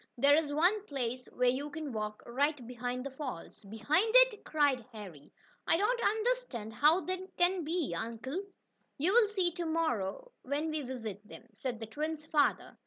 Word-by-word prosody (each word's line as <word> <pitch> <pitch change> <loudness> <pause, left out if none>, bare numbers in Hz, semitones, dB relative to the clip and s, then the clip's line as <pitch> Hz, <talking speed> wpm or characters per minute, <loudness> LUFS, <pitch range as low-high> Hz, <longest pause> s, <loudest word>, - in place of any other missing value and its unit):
There 280 +4 +5
is 305 -2 +1
one 360 +8 +3
place 255 -2 -3
where 250 0 +2
you 275 +4 -1
can 295 -3 -6
walk 215 -1 -4
right 280 +2 0
behind 250 +1 -4
the 275 - -4
falls." 255 - -7
"Behind 285 - +1
it!" - - +6
cried 285 -5 +2
Harry. 190 -10 -10 0.4
"I 330 - +4
don't 470 +6 +1
understand 435 - 0
how 310 +9 +5
that 370 0 -5
can 355 0 +2
be, 325 -1 -1
uncle." 235 - -4 0.6
"You'll 410 +10 +4
see 375 -4 +1
to 345 0 -4
morrow, 320 - -1
when 290 +4 -2
we 310 -1 -2
visit 225 -6 -6
them," - - -11
said 230 +2 -4
the 225 - -5
twins' 305 +6 -4
father. 300 -2 +1
290 Hz, 170 wpm, -32 LUFS, 240-350 Hz, 0.6 s, it